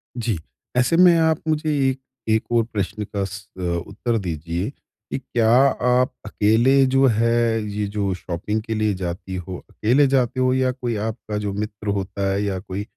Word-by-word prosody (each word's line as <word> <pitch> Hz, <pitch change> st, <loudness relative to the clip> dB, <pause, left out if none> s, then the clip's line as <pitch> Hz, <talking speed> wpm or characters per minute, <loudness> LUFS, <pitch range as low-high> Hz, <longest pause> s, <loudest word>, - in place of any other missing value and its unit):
जी। 115 Hz, -5 st, -1 dB, 0.4 s
ऐसे 125 Hz, +6 st, +3 dB
में 180 Hz, -1 st, +7 dB
आप 160 Hz, -1 st, +2 dB
मुझे 155 Hz, 0 st, 0 dB, 0.2 s
ए 130 Hz, -, -1 dB, 0.4 s
एक 110 Hz, -, +2 dB
और 120 Hz, -1 st, +4 dB
प्रश्न 105 Hz, +1 st, -2 dB
का 100 Hz, -1 st, -3 dB
स 100 Hz, 0 st, -8 dB
अ, -, -, -5 dB, 0.3 s
उत्तर 120 Hz, -2 st, -2 dB
दीजिए, 85 Hz, +2 st, -3 dB, 0.4 s
कि -, -, -1 dB
क्या 120 Hz, -4 st, 0 dB
आप 125 Hz, 0 st, +3 dB
अकेले 115 Hz, +6 st, +4 dB
जो 135 Hz, +1 st, +3 dB
है, 115 Hz, 0 st, +2 dB
ये 105 Hz, 0 st, -2 dB
जो 100 Hz, -1 st, -1 dB
शॉपिंग 90 Hz, +4 st, -3 dB
के 110 Hz, +1 st, -4 dB
लिए 110 Hz, -1 st, +1 dB
जाती 95 Hz, 0 st, -5 dB
हो, 90 Hz, 0 st, -5 dB
अकेले 130 Hz, +6 st, +3 dB
जाते 130 Hz, -2 st, +1 dB
हो 130 Hz, 0 st, +3 dB
या 130 Hz, 0 st, +2 dB
कोई 125 Hz, -3 st, -3 dB
आपका 110 Hz, -1 st, -5 dB
जो 105 Hz, -1 st, -2 dB
मित्र 105 Hz, 0 st, -5 dB
होता 100 Hz, 0 st, -2 dB
है 100 Hz, +1 st, 0 dB
या 100 Hz, -2 st, -1 dB
कोई 95 Hz, +1 st, -5 dB
110 Hz, 180 wpm, -22 LUFS, 100-125 Hz, 0.4 s, में